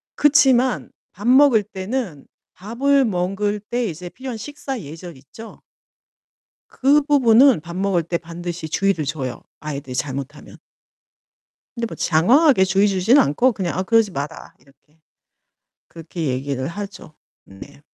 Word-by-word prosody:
그렇지만 265 -4 +3 0.2
밥 205 +5 -7
먹을 260 -4 +5
때는 195 - -5 0.3
밥을 265 +7 +1
먹을 200 +2 -1
때 240 +3 -3
이제 175 -2 -6
필요한 260 +2 -7
식사 270 +2 -6
예절 165 +2 -10
있죠? 220 +12 -13 1.1
그 280 +3 +3
부분은 265 - +5
밥 170 +3 -9
먹을 190 -3 0
때 170 +1 -3
반드시 170 -1 -7
주의를 195 -1 0
줘요 135 -4 -4 0.2
아이들이 140 -3 -6
잘못하면. 140 +2 -5 1.2
근데 230 0 -2
뭐 - - -8
장황하게 235 - +4
주의 195 +2 +2
주지는 200 +8 +4
않고 240 - +2
그냥 180 -5 -3
"아 - - +1
그러지 225 +1 +2
마라." 150 0 -7
이렇게, 150 +3 -28 0.9
그렇게 165 -1 -7
얘기를 130 0 -3
하죠. 200 -3 -8 0.3
네. 140 +9 -14
190 Hz, 280 characters per minute, -20 LUFS, 155-240 Hz, 1.2 s, 먹을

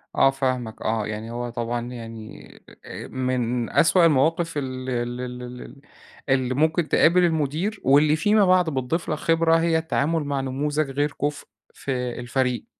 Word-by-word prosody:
آه - - +5
فاهمك 130 -4 -3
آه. 110 -1 -1
يعني 110 +2 -5
هو 120 0 -4
طبعًا 120 0 -3
يعني 115 -2 -9 0.4
أ - - -8
من 125 -2 -2
أسوأ 170 +1 +4
المواقف 165 +2 +2
ال 130 -2 -4
ال 120 0 -3
ال 125 0 -6
ال 125 +2 -9 0.5
اللي 130 -1 +1
ممكن 155 +3 +1
تقابل 180 +3 +4
المدير، 165 +5 -1
واللي 150 +3 +4
فيما 205 +5 +3
بعد 180 -2 +3
بتضيف 140 +4 -2
لك 155 - -1
خبرة، 165 0 +2
هي 165 -1 +2
التعامل 160 0 0
مع 140 -1 -2
نموذج 145 +2 -1
غير 145 +2 0
كُفء 145 0 -2 0.3
في 140 - -6 0.3
الفريق. 125 - -1
135 Hz, 155 wpm, -23 LUFS, 125-160 Hz, 0.5 s, آه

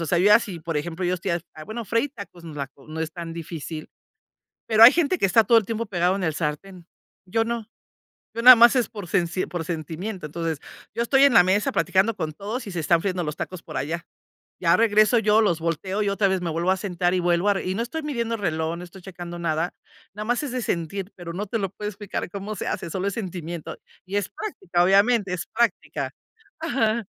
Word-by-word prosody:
O 165 - -2
sea, 175 - +2
yo 205 +4 +5
así, 195 -7 +1
por 165 -1 -3
ejemplo, 170 +4 -3
yo 180 - +1
estoy 180 0 -2 0.2
ha 155 - -9
bueno, 225 +4 -5
freír 235 +4 0
tacos, 190 -5 -10
no 165 - -8
es - - -11
la 140 - -2
co 140 +1 -21
no 160 +1 -5
es 160 0 -2
tan 170 -2 -6
difícil, 160 -1 -6 0.8
pero 220 0 +6
hay 245 - +12
gente 345 +2 +1
que - - +2
está 220 +4 +5
todo 235 0 +5
el 215 - +3
tiempo 230 +1 -3
pegado 180 -1 +1
en 195 - -3
el 160 -2 0
sartén. 165 +4 -4 0.4
Yo 225 +4 +1
no, 235 -2 -3 0.7
yo 230 - -2
nada 255 0 +12
más 235 +2 +7
es 250 -2 +1
por 205 -3 -8
por - - -13
sensi 180 -1 0
por 175 -3 -4
sentimiento. 170 +4 -5
Entonces, 165 -1 -3 0.3
yo - - -2
estoy 270 +3 +4
en 280 -3 +6
la 180 - +8
mesa 190 +3 +2
platicando 190 +6 +2
con 155 -4 -3
todos 215 - -5
y - - -5
se 175 - -3
están 165 +2 +3
friendo 185 -2 -1
los 150 -1 -4
tacos 185 -2 -6
por - - -10
allá. 165 +4 -3 0.5
Ya 170 -2 +4
regreso 220 +1 +4
yo, 215 0 +4
los 175 -6 +2
volteo 170 +5 -2
y 200 - +1
otra 200 0 +2
vez 190 -1 0
me 170 - -2
vuelvo 170 +3 +1
a 190 - +2
sentar 180 -2 -1
y - - +1
vuelvo 175 +3 +2
a - - +5
re - - -3
y 185 - -1
no 230 - -1
estoy 320 +7 -5
midiendo 235 -6 -2
reloj, 160 -3 -2
no 175 - -8
estoy 185 +2 -12
checando 175 -2 -8
nada. 165 0 -1 0.4
Nada 210 +1 -6
más 245 +5 0
es 280 - -4
de 250 0 -2
sentir, 180 +2 -3
pero 170 -2 -7
no 205 +4 -3
te 225 +2 -2
lo 195 -2 -1
puedo 210 +2 -6
explicar 205 -3 -5
cómo 205 +2 -5
se - - -5
hace, - - -3
solo 190 +3 -2
es 200 - -1
sentimiento 175 -6 -5 0.3
y 195 +2 -5
es 200 -1 -1
práctica, 180 - -1
obviamente, 200 +1 +3
es 180 - -3
práctica. 155 - -1 0.5
Ajá. 235 -7 0
190 Hz, 240 wpm, -24 LUFS, 170-220 Hz, 0.8 s, hay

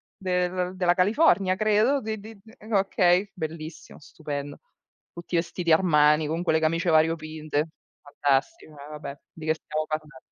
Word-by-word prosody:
del 180 0 -1
della 180 -1 +2
California 195 - +3
credo. 215 +7 +2
Di 220 0 -4
d 220 +2 -11
d 225 +1 -17 0.2
okay, 195 0 +2
bellissimo, 160 -2 -7
stupendo. 145 -1 -7 0.5
Tutti 170 +1 -6
vestiti 170 0 -1
Armani, 150 -3 +4
con 165 +3 -2
quelle 160 -2 +2
camicie 165 +2 0
variopinte. 155 -1 0 0.3
Fantastico, 145 +1 -1
eh 145 0 -11
va 150 - -7
beh, 140 -1 -8
di 160 -1 -10
che 155 - +2
stiamo 155 0 -4
parlando, 155 -3 -5
165 Hz, 145 wpm, -26 LUFS, 155-185 Hz, 0.5 s, Armani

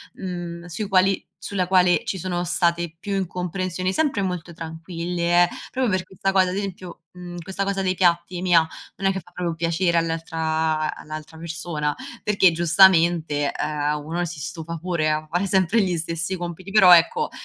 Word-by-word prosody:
mhmm, 175 -2 -6
sui 195 +4 -5
quali 190 0 +3 0.2
sulla 185 -3 -1
quale 180 -1 +4
ci 190 - -2
sono 175 0 -2
state 170 -1 0
più 200 +1 -3
incomprensioni, 185 0 -2
sempre 280 -9 +1
molto 180 -2 -4
tranquille, 170 +2 0
eh, - - +3 0.2
proprio 255 -3 0
per 185 - -2
questa 190 +1 -2
cosa, 190 -1 +3
ad 180 - -3
esempio, 185 -4 -6
mhmm, 175 -1 -9
questa 190 +3 -4
cosa 195 0 -1
dei 185 -1 +1
piatti 175 -1 +1
mia, 170 -3 +4 0.3
non 195 - -1
è - - +4
che 190 - -3
fa 175 - -17
proprio 175 -1 -3
piacere 170 +1 0
all'altra 160 -1 -1
all'altra 155 +1 -9
persona, 160 -2 -3 0.3
perché 200 -4 +4
giustamente, 165 -3 +4
ehm, 150 0 -2
uno 170 +3 -2
si 170 -2 -7
stufa 165 +2 -5
pure 165 -2 0
a 155 0 -2
fare 175 +4 0
sempre 190 +3 +2
gli 180 -2 0
stessi 165 +3 -2
compiti. 175 +2 -6
Però, 190 -3 +7
ecco, 175 - +2
175 Hz, 170 wpm, -23 LUFS, 165-185 Hz, 0.3 s, Però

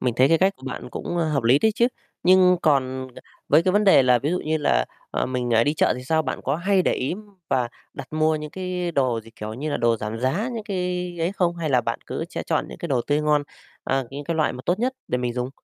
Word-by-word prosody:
mình 125 -3 0
thấy 130 +2 +5
cái 165 - +4
cách 195 +2 +2
của 130 - -15
bạn 125 -1 -6
cũng, 175 - -4
a, 165 - +2
hợp 150 -4 0
lý 120 +5 +5
đấy 220 +5 +2
chứ, 235 - +3 0.4
nhưng 180 0 +6
còn, 130 -3 +1
ờ, - - -11 0.3
với 155 +3 +5
cái 185 - +1
vấn 210 +1 +3
đề 190 -8 +7
là 125 -1 +4
ví 145 +6 -1
dụ 180 - 0
như 160 +1 0
là, 60 - +2 0.3
ờ, - - -1
mình, 125 -1 -2
ờ, 115 0 +4
đi 150 - +1
chợ - - +3
thì 125 - -8
sao? 160 +4 +2
Bạn 130 - -4
có 140 +3 0
hay 190 +2 +2
để - - +2
ý 135 +7 -1 0.3
và 125 -2 +1 0.3
đặt - - -9
mua 155 0 +2
những 150 0 -6
cái 180 -1 -3
đồ 130 -6 +1
gì, 115 +1 -16
kiểu 110 +1 -6
như 145 +6 -4
là - - 0
đồ 115 -1 +2
giảm 110 +1 -5
giá, 165 - 0
những 220 -2 -5
cái 180 -3 -3
ấy 165 +3 0
không? 175 -3 0
Hay 160 -3 -2
là 125 -2 +4
bạn - - -3
cứ - - -3
sẽ - - -4
chọn - - -1
những - - -10
cái 170 - -5
đồ 130 -4 +1
tươi 145 +1 +2
ngon, 150 -1 +2 0.4
ờ, 135 -2 0
những 140 +1 -7
cái 165 - -2
loại 155 -3 +1
mà 125 - -8
tốt 180 - +1
nhất 250 +3 0 0.2
để 125 - 0
mình 125 -1 -2
dùng? 125 +1 -3
150 Hz, 285 wpm, -23 LUFS, 125-180 Hz, 0.4 s, đề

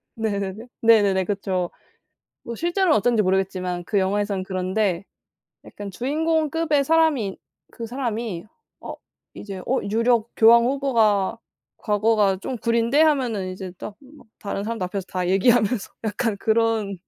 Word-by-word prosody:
네네네. 210 0 -3
네네네. 205 -5 +4
그쵸. 190 -3 -2 0.7
뭐 235 - -6
실제로는 345 - +1
어떤지 225 +1 +2
모르겠지만 185 -2 -1
그 200 +4 0
영화에서는 200 0 -1
그런데 185 0 -1 0.6
약간 205 -1 -8
주인공급의 310 - 0
사람인 300 -10 +2 0.4
그 230 - -7
사람이 230 -7 -4 0.4
'어 - - -7 0.4
이제 195 -2 -8
어 265 - +1
유력 230 +1 +2
교황 235 +1 +7
후보가 230 -6 +1 0.4
과거가 210 -2 +2
좀 250 +6 -5
구린데?' 235 +5 +1
하면은 250 -11 +1
이제 185 0 -7
딱 205 - -8
막 285 -1 -18
다른 200 -1 -4
사람들 225 -3 -3
앞에서 185 +1 -4
다 180 -1 -2
얘기하면서 215 +2 +2
약간 215 0 -1
그런 220 -3 0
215 Hz, 305 characters per minute, -23 LUFS, 195-245 Hz, 0.7 s, 교황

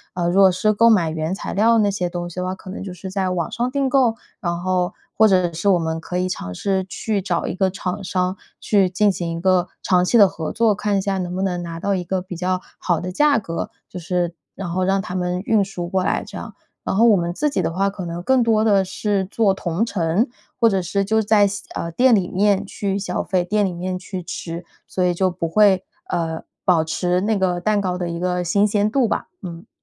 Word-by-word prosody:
呃， 175 -1 0
如 190 +3 +4
果 190 -1 +7
是 215 +4 +1
购 230 +3 +5
买 180 -8 +3
原 160 +3 -2
材 - - -5
料 225 +3 +4
那 205 -2 +3
些 180 -3 -2
东 175 0 -4
西 175 - -11
的 180 - -2
话， 185 +1 -2
可 185 0 -10
能 - - -6
就 195 - -6
是 185 +1 -8
在 190 -1 0
网 175 -3 -2
上 240 +1 -1
订 275 +1 0
购， 255 -4 +3 0.3
然 170 -3 -2
后， 180 0 0 0.2
或 220 - +6
者 185 -4 +2
是 175 +5 0
我 190 - +5
们 160 -1 -2
可 180 - -4
以 180 0 0
尝 130 - -4
试 190 - 0
去 205 +2 -2
找 180 -3 -1
一 - - -2
个 190 +1 +1
厂 185 +1 -4
商 185 0 -1 0.2
去 195 -3 +2
进 200 +3 +3
行 175 -3 -3
一 - - -5
个 185 0 +2 0.2
长 180 -1 +3
期 210 +6 +3
的 205 -3 +8
合 160 -3 -5
作， 225 -2 +3
看 205 0 0
一 - - +1
下 195 -1 -1
能 180 -1 -3
不 190 - -1
能 180 -2 -1
拿 165 -1 -6
到 200 +3 0
一 185 -2 -1
个 185 +2 -1
比 185 -1 -7
较 185 +1 -1 0.2
好 175 -3 0
的 180 - -4
价 295 +8 +3
格， 170 -6 -4 0.2
就 180 - -8
是 175 0 -1 0.2
然 195 - -5
后 185 +2 0
让 195 +1 +2
他 180 - -6
们 180 0 -1
运 215 -2 +3
输 180 -3 -5
过 185 +1 0
来 - - 0
这 - - -11
样。 - - -7 0.3
然 - - -2
后 220 - +4
我 220 -4 +6
们 170 -1 -2
自 300 +11 0
己 280 - -1
的 165 - -1
话 195 +3 +1
可 195 -2 -6
能 170 +1 -5
更 265 +4 +3
多 220 -2 +3
地 200 -3 +3
是 195 +1 -1
做 200 +1 +2
同 185 +2 -1
城， 195 +1 0 0.3
或 230 - +4
者 195 -3 +1
是 190 +3 -1
就 220 +3 +2
在 210 -1 +4
线 200 0 -3
啊， 170 - -4
店 245 +6 +4
里 185 -4 0
面 200 +1 +2
去 195 0 -3
消 190 -3 -2
费， 185 -2 0
店 205 +3 +1
里 185 - -2
面 180 +1 -3
去 185 -1 -6
吃。 170 0 -6 0.2
所 185 - -1
以 180 0 +2
就 185 +2 +1
不 170 -2 -3
会 195 0 +4 0.2
呃， 160 -1 -2 0.2
保 165 -3 +3
持 180 +2 0
那 210 +3 +1
个 180 -2 +1
蛋 210 +3 +1
糕 180 -2 -1
的 180 -1 -3
一 170 - -4
个 180 +1 -1
新 190 +4 +2
鲜 210 0 +1
度 260 +2 +2
吧， 220 - -2
嗯。 170 -2 -8
185 Hz, 270 characters per minute, -21 LUFS, 175-205 Hz, 0.3 s, 的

